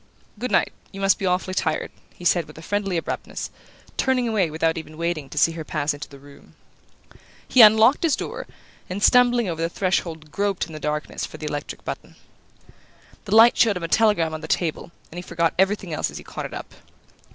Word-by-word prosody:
"Good 250 +2 -2
night; - - +2 0.2
you 195 - -9
must 195 +2 +3
be 195 - -1
awfully 185 +1 0
tired," 160 -4 -1 0.2
he 175 - -11
said 175 -2 +3
with 150 - -15
a 160 - -10
friendly 195 -1 -1
abruptness, 165 - -4 0.5
turning 255 -2 +1
away 205 -7 +1
without 160 +1 0
even 155 -1 -8
waiting 165 -4 -2
to - - -10
see 165 - +4
her 165 -1 -6
pass 150 0 -1
into 145 - -8
her 140 - -12
room. 140 +1 -17 0.9
He 255 - +6
unlocked 220 +4 +7
his 330 -4 +2
door, - - -6 0.4
and 195 +3 -4
stumbling 245 -2 +5
over 165 -2 -3
the 165 - 0
threshold 165 -4 -2
groped 200 0 -1
in 160 - -12
the 155 - -6
darkness 150 0 -3
for - - -11
the 155 - -7
electric 145 -1 -5
button. - - -6 1.1
The 205 +1 0
light 230 +2 +8
showed 215 -5 +3
him 175 - -7
a - - -1
telegram 190 -5 +2
on 155 - -5
the - - -7
table, 170 0 -1 0.2
and 175 - -6
he - - -5
forgot 170 -2 0
everything 195 -3 +1
else - - -1
as - - -8
he - - -9
caught - - -6
it - - -14
up. - - -8
175 Hz, 210 wpm, -23 LUFS, 160-205 Hz, 1.1 s, light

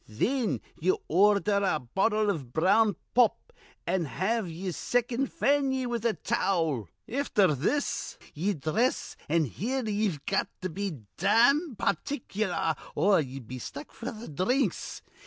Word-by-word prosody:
Thin 230 - 0 0.2
ye 185 +3 +2
ordher 200 +3 +4
a - - -2
bottle 205 - +1
iv 135 -9 -5
brown 200 - +3 0.2
pop, 245 -3 +2 0.3
an' 175 -1 0
have 190 - -1
ye'er 180 +3 -4
second 245 - 0
fan 280 -1 +2
ye 260 -1 -1
with 235 -2 -2
a 225 - 0
towel. 155 - 0 0.2
Afther 220 - +2
this 185 - -1 0.2
ye'd 175 0 -1
dhress, 225 - 0
an' 165 0 +3
here 235 - -2
ye've 205 -8 -1
got 195 - +1
to 185 - -2
be 185 - -4 0.2
dam 245 - +4
particklar 200 - -1 0.2
or 190 +3 +4
ye'll 135 -2 -7
be 125 +3 -7
stuck 140 +4 -8
f'r 230 -1 -7
th' - - -9
dhrinks. 250 - 0
200 Hz, 140 wpm, -28 LUFS, 160-235 Hz, 0.3 s, ordher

